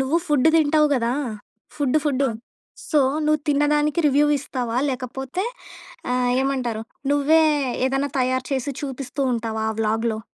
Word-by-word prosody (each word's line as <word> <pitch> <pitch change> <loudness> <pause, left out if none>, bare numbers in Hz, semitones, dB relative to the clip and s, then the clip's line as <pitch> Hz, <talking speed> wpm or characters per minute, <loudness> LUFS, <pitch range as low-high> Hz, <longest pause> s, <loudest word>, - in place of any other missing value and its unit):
నువ్వు 265 +5 +1
ఫుడ్ 295 0 +3
తింటావు 305 0 +4
కదా! 240 -2 0 0.6
Food 290 0 +2
food! 275 -2 +1 0.6
సో, 305 - +4 0.3
నువ్వు 305 -1 +2
తిన్నదానికి 295 +2 +2
రివ్యూ 290 +1 +4
ఇస్తావా? 250 -4 -4
లేకపోతే 265 +6 -4 0.7
ఆహ్, 250 -1 +1
ఏమంటారు! 250 -5 -2 0.3
నువ్వే 305 +3 +4 0.4
ఏదేనా 270 +2 0
తయారు 255 0 0
చేసి 270 +2 -1
చూపిస్తూ 270 0 -5
ఉంటావా 220 -1 -3
ఆ - - -4
వ్లాగ్‌లో? 220 +1 0
270 Hz, 130 wpm, -22 LUFS, 250-295 Hz, 0.7 s, తింటావు